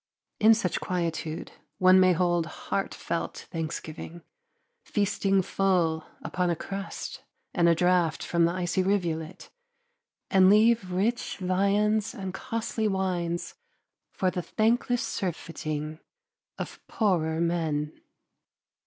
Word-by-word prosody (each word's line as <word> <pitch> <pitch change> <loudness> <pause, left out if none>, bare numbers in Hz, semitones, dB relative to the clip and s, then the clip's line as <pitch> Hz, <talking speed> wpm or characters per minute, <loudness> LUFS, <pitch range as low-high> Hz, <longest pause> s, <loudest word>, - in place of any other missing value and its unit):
In 220 +1 +7
such 185 -6 -1
quietude 165 -3 -3 0.3
one 185 0 +6
may 185 -1 +6
hold 175 -1 +1
heartfelt 170 0 -3
thanksgiving, 165 0 -5 0.6
feasting 195 -2 +1
full 175 -5 +1 0.2
upon 180 -1 -1
a 170 - +1
crust 195 +4 -6 0.3
and 170 -2 +4
a 170 - +5
draught 180 -2 +2
from 170 -1 +2
the 170 - +2
icy 180 +1 0
rivulet, 180 -3 -2 0.8
and 190 -1 +6
leave 215 -2 +4
rich 215 +7 0
viands 200 +3 +1
and 190 -2 -5
costly 225 +2 -2
wines 180 -3 -1 0.6
for 185 -1 0
the 180 - -2
thankless 235 +5 +1
surfeiting 155 -4 -4 0.6
of - - -6
poorer 165 -7 +1
men. 160 -3 0
180 Hz, 110 wpm, -27 LUFS, 165-195 Hz, 0.8 s, In